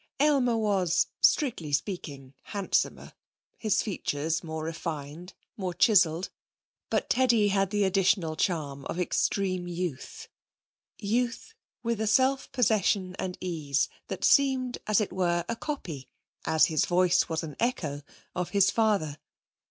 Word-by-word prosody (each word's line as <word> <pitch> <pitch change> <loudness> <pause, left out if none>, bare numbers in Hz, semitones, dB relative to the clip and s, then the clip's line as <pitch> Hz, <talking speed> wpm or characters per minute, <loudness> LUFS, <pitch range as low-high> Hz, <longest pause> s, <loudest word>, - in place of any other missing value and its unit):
Aylmer 270 -5 +3
was, 190 -5 +2 0.2
strictly 235 - +2
speaking, 140 -4 -3 0.2
handsomer. 200 -2 -1 0.5
His 215 -3 +1
features 160 -5 -2
more 160 -1 -5
refined, 160 +1 -6 0.2
more 185 -4 -3
chiselled. 185 -5 +3 0.6
But - - 0
Teddy 235 -5 +3
had 195 -1 +1
the 205 0 +1
additional 190 -4 +2
charm 150 -6 -2
of 175 - -4
extreme 185 0 0
youth 175 - -5 0.7
youth 240 - -2 0.3
with 230 -2 -1
the 220 - 0
self 265 +5 +2
possession 205 -7 +1
and 180 -1 -3
ease 150 -6 -1 0.2
that - - -5
seemed, 260 -3 +3
as 215 0 +3
it 205 - -3
were, 175 -2 0
a 230 - -2
copy 180 - -6 0.4
as 160 0 +4
his 155 -2 +1
voice 180 0 +3
was 160 0 -2
an 150 -3 -7
echo 160 - -1 0.3
of 180 -1 -3
his 200 -1 +3
father. 200 -10 +1
185 Hz, 130 wpm, -28 LUFS, 160-220 Hz, 0.7 s, as